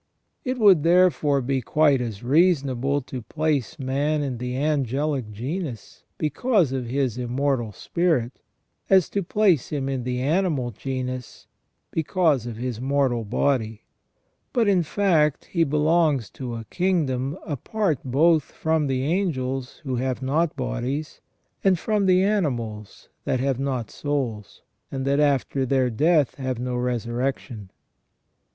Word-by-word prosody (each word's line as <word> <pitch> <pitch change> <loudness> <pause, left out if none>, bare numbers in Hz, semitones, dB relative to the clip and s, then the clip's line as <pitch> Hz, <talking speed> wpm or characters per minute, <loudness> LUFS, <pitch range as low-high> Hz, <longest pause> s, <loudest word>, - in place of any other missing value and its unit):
It 255 -1 -2
would 200 -8 +6
therefore 165 -4 +3
be 135 +1 0
quite 140 +4 +3
as 115 -4 -5
reasonable 140 -2 +2
to 130 -1 -6
place 150 +1 -1
man 145 +3 0
in 130 -4 -3
the 125 +1 -3
angelic 140 -3 0
genus 130 - -5 0.2
because 165 - +1
of 130 -2 -3
his 130 -2 -1
immortal 125 -1 -1
spirit, 130 - -1 0.5
as 190 -3 +5
to 200 - 0
place 190 - +2
him 140 -3 -2
in 135 -2 -2
the 125 0 -2
animal 145 -3 0
genus 130 0 -5 0.5
because 160 - +1
of 115 -2 -6
his 120 -1 -4
mortal 135 -3 +1
body; 110 0 -1 0.7
but 235 -3 +2
in 190 -3 +4
fact 160 -4 +1
he 170 -2 +1
belongs 150 - +2
to 125 -3 -6
a 115 -1 -7
kingdom 155 -6 0
apart 165 - -1
both 155 +5 +3
from 160 -2 -1
the 130 -1 -1
angels 135 -6 -2
who 130 -4 -2
have 130 +1 -2
not 150 +4 +1
bodies, 130 +3 -3 0.4
and 190 -2 +4
from 210 +2 0
the 185 0 +5
animals 120 - -2 0.2
that 130 - 0
have 135 -1 0
not 130 -5 -2
souls, 130 -8 -4 0.3
and 135 -1 -3
that 140 +1 +2
after 140 -2 +1
their 130 -1 +1
death 150 +3 +3
have 130 -2 -3
no 125 +1 -3
resurrec 125 +1 -1
tion. 105 -7 -11
135 Hz, 140 wpm, -24 LUFS, 125-160 Hz, 0.7 s, would